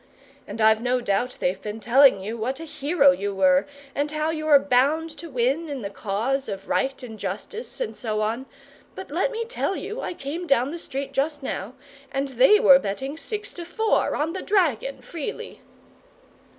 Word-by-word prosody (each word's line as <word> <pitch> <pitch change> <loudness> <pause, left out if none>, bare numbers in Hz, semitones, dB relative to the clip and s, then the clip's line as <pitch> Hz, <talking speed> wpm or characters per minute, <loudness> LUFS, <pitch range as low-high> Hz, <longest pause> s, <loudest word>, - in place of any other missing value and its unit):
And - - -7
I've 220 0 +5
no 250 +1 +1
doubt 240 +2 -1
they've 185 +2 -1
been 210 +1 -5
telling 250 0 +5
you 215 +4 -4
what 250 +5 -3
a - - -6
hero 285 -1 +3
you 205 -6 -3
were, 275 +6 +4 0.3
and 290 +1 -1
how 305 +1 -1
you 310 -1 -4
were 295 -2 +8
bound 285 +4 +2
to 335 - -8
win, 270 +5 0
in 275 -5 -5
the 200 - -4
cause 230 +7 -2
of 195 -1 -6
right 270 -1 -1
and 220 -3 -9
justice, 205 - -6
and - - -3
so 215 -3 -2
on; 230 +5 -2 0.5
but - - -8
let - - +1
me 460 -1 -3
tell 460 -4 -2
you, 445 +4 -5
I - - -4
came 330 +6 -5
down 275 -1 +2
the 340 - -6
street 275 -3 -5
just 285 +1 -1
now, 235 -1 -4 0.4
and 275 +1 -1
they 265 - +5
were 270 -8 +8
betting 265 +6 -4
six 415 +5 -4
to 350 - -7
four 435 +6 +1
on 315 +3 -1
the 375 - -4
dragon 290 - 0
freely!" 335 +5 -6
275 Hz, 190 wpm, -24 LUFS, 230-320 Hz, 0.5 s, were